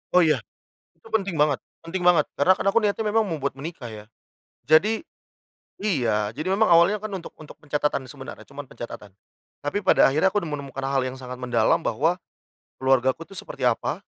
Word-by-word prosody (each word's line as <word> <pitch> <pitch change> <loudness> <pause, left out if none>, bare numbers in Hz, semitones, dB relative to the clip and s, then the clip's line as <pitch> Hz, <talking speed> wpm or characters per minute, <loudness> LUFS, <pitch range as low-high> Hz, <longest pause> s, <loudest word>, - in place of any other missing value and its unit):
Oh 180 - +7
ya, 155 -2 +3 0.6
itu - - -18
penting 195 -6 0
banget, 145 -2 +2 0.2
penting 180 +3 -3
banget. 175 -4 +5
Karena 165 +6 +4
kan - - -4
aku 200 +4 +4
niatnya 210 +1 0
memang 215 +1 +3
membuat 145 -4 -2
menikah 140 -2 -7
ya. 105 -1 -10 0.6
Jadi 205 +9 +4 0.8
iya, 115 - +1
jadi 155 +9 -5
memang 215 -3 +3
awalnya 180 +5 +5
kan 215 - -4
untuk 190 -3 -7
untuk 155 - -13
pencatatan, 145 -2 -1
sebenarnya 135 +1 -10
cuman 140 +1 -8
pencatatan. 120 -6 -9 0.5
Tapi 145 +6 -2
pada 185 - +6
akhirnya 155 +8 +2
aku 205 - +2
menemukan 140 -5 -5
hal 135 -1 +1
yang 130 0 -5
sangat 125 -1 -7
mendalam 125 -3 +1
bahwa 155 +10 +1 0.7
keluargaku 130 +4 +2
tuh 195 - -11
seperti - - -1
apa, - - -1
150 Hz, 175 wpm, -24 LUFS, 130-185 Hz, 0.8 s, Oh